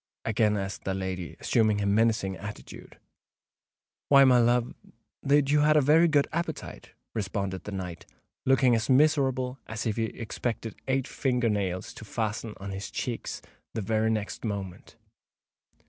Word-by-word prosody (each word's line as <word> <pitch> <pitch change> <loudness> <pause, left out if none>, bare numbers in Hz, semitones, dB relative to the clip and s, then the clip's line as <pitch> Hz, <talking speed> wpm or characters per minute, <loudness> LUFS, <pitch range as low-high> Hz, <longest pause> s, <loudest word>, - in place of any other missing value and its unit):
again 110 -1 +2
asked 95 0 -4
the 95 - -2
lady, 95 -2 -4
assuming 110 -2 +2
a 100 - -1
menacing 105 -2 +2
attitude. 100 +2 -10 1.1
"Why, 140 -1 +8
my 130 -2 +6
love—that 125 +4 0
you 150 - +4
had 155 +1 +4
a - - +7
very 155 +4 +5
good 145 -3 +3
appetite," 170 +1 -5 0.2
responded 100 -3 -3
the 105 - -5
knight, 90 -3 -6 0.4
looking 130 -1 +4
as 110 -1 0
miserable 130 -2 +2
as 110 +1 -4
if 110 -1 -1
he 115 - +1
expected 115 0 -4
eight 130 -1 0
finger 125 -3 0
nails 95 -3 -2
to - - -10
fasten 110 0 -3
on 100 0 -7
his 95 +1 -5
cheeks - - -4 0.3
the 110 - -1
very 110 +2 +1
next 110 -2 -3
moment. 100 -3 -5
110 Hz, 145 wpm, -28 LUFS, 100-130 Hz, 1.1 s, Why